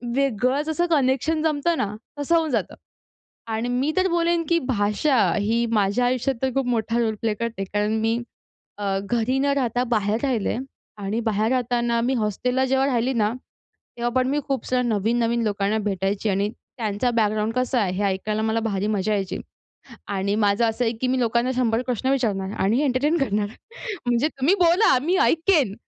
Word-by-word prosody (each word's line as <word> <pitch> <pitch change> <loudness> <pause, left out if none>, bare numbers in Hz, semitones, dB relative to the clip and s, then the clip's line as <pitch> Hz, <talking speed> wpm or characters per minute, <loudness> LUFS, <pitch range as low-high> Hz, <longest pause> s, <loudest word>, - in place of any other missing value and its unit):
वेगळंच 275 +3 +1
असं 345 +2 +1
कनेक्शन 290 +2 +1
जमतं 320 +2 +1
ना, 210 0 -2 0.2
तसं 310 +4 +1
होऊन 320 -2 +2
जातं. 220 -6 -1 0.7
आणि 225 +2 -2
मी 260 +5 0
तर 375 0 +3
बोलेन, 340 0 +1
की 335 0 +3
भाषा 215 +5 +1 0.2
ही 225 +3 +1
माझ्या 210 +3 +2
आयुष्यात 255 +1 0
तर 265 - +2
खूप 270 -2 0
मोठा 230 -1 0
रोल 220 -2 0
प्ले 220 -2 +1
करते 230 -2 -3
कारण 210 +2 -1
मी 225 +1 +1 0.6
अ, 195 -1 -1
घरी 240 +2 +1
न 275 - +1
राहता 245 -2 0
बाहेर 210 +1 +1
राहिले 245 -7 0
आहे. 235 - -1 0.4
आणि 210 +4 -1
बाहेर 220 -1 0
राहताना 240 -2 +1
मी 255 +3 +1
हॉस्टेलला 250 +4 0
जेव्हा 265 +1 +2
राहिली 250 0 +1
ना 215 -2 +1 0.7
तेव्हा 240 0 -1
पण 255 0 +2
मी 290 +2 +1
खूप 270 -1 -1
साऱ्या 250 0 +1
नवीन-नवीन 230 +1 +1
लोकांना 205 +1 0
भेटायची 200 0 -1
आणि 200 +1 +1 0.3
त्यांचा 220 +1 -1
बॅकग्राऊंड 215 0 +1
कसा 255 0 0
आहे, 190 -4 0
हे 205 - -1
ऐकायला 210 +3 -1
मला 220 +1 0
भारी 205 -3 -1
मजा 210 +1 0
यायची. 195 -2 -2 0.7
आणि 200 0 -1
माझं 205 +1 +2
असं 235 +2 -1
आहे, 225 - +1
की 255 - 0
मी 255 0 +1
लोकांना 235 +2 +1
100 235 -1 +1
प्रश्न 255 +1 -1
विचारणार 205 -8 0
आणि 220 +7 +2
एंटरटेन 290 +4 +1
करणार. 210 -5 0 0.6
म्हणजे 245 +5 +2
तुम्ही 290 +6 +1
बोला 345 - +5
मी 355 +5 +1
ऐकेन. 320 - +2
235 Hz, 180 wpm, -23 LUFS, 210-265 Hz, 0.7 s, बोला